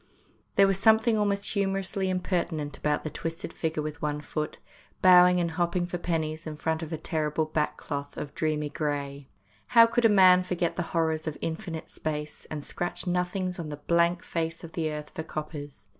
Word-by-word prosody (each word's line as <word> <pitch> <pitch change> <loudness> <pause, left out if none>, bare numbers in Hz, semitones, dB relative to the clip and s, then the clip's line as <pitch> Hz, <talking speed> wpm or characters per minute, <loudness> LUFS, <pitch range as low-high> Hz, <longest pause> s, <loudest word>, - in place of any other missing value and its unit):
There 200 - +7
was 195 -1 +1
something 220 +1 +5
almost 205 -1 0
humorously 195 -1 0
impertinent 170 -5 -1
about 150 -1 0
that 155 - -5
twisted 165 +5 -5
figure 160 -2 -2
with 155 +1 -6
one 150 -1 -1
foot 150 +1 -4 0.4
bowing 180 -1 +7
and 170 -1 0
hopping 175 +1 0
for 175 0 -4
pennies 160 -2 -2
in 155 - -5
front 160 +2 -1
of 160 0 -6
a 160 - -2
terrible 155 0 -1
back 155 -1 -1
cloth 145 -1 -5
of 145 - -5
dreamy 150 -2 -1
grey. 140 -2 -3 0.5
How 230 - +11
could 230 +1 +1
a - - +7
man 185 -3 +7
forget 180 -2 -1
the - - -1 0.2
horrors 160 -1 0
of 155 - -3
infinite 165 -1 -4
space, 150 -1 -5
and 150 -2 -5
scratch 175 0 -3
nothings 180 0 -1
on 160 -2 -4
the 145 - -5
blank 170 +3 +2
face 165 0 -3
of 165 - -8
the 160 -2 -1
earth 150 0 -6
for - - -4
coppers? 145 -8 -7
165 Hz, 190 wpm, -28 LUFS, 150-180 Hz, 0.5 s, How